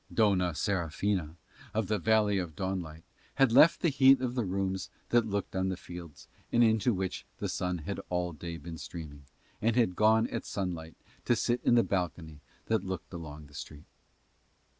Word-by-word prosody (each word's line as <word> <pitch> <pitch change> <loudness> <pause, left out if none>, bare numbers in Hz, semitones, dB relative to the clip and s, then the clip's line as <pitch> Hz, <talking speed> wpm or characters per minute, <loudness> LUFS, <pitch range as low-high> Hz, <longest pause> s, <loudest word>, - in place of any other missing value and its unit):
Dona 95 -6 +2
Serafina 85 0 -1 0.4
of 110 -1 +1
the 105 +1 0
Valley 105 -3 +3
of 85 -4 -5
Dawnlight 85 -4 -4 0.3
had 135 -3 +4
left 150 +7 +6
the 170 - +3
heat 135 -1 +6
of 125 -1 -2
the 125 -2 0
room 95 0 -1 0.3
that 120 -2 +3
looked 100 -2 -3
on 95 0 +1
the 95 - -2
fields, 85 -4 -10 0.2
and 120 - +5
into 110 +1 +3
which 95 -3 -3
the - - -3
sun 90 -1 -2
had 85 +5 -5
all 90 -1 -1
day 85 +2 -6
been 80 -1 -8
streaming, 75 -4 -8 0.4
and 115 +1 +2
had 115 -7 +2
gone 110 +2 +4
at 115 - -3
sunset 85 -5 -4 0.3
to 120 - +3
sit 120 +1 0
in 120 - +4
the 120 - +5
balcony 85 -5 -3 0.3
that 110 -3 +1
looked 95 -5 -6
along 75 -3 -8
the 75 - -18
street. 75 +1 -9
95 Hz, 180 wpm, -30 LUFS, 85-110 Hz, 0.4 s, left